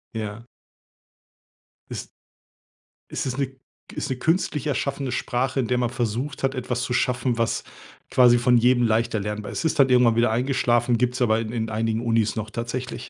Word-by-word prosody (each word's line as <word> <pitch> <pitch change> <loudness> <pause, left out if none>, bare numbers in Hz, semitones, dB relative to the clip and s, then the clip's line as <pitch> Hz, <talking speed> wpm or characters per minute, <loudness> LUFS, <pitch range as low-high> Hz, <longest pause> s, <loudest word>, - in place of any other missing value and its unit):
Ja. 110 +1 -5 1.4
Ist - - -6 1.0
Es - - -3
ist 130 0 -3
'ne 135 -1 -2 0.4
ist - - -4
'ne 130 - -1
künstlich 160 -2 0
erschaffende 140 -1 -2
Sprache, 130 +2 -1
in 120 - 0
der 125 - +1
man 120 -1 +1
versucht 125 +3 -3
hat, 135 0 0
etwas 125 0 -2
zu 125 - -3
schaffen, 125 -1 0
was 115 0 0 0.5
quasi 120 -1 +5
von 125 0 +4
jedem 120 +1 +4
leicht 115 +1 +1
erlernbar 105 -1 -3
ist. - - -4
Es - - -3
ist - - -9
halt 135 -1 +5
irgendwann 125 -2 +5
wieder 115 -1 +3
eingeschlafen, 120 -1 +1
gibt's 125 +2 0
aber 110 -2 +3
in 110 -1 -4
in 115 -2 -2
einigen 110 +1 -1
Unis 115 -2 +1
noch 110 0 -4
tatsächlich. 120 +2 -5
120 Hz, 180 wpm, -24 LUFS, 115-130 Hz, 1.4 s, quasi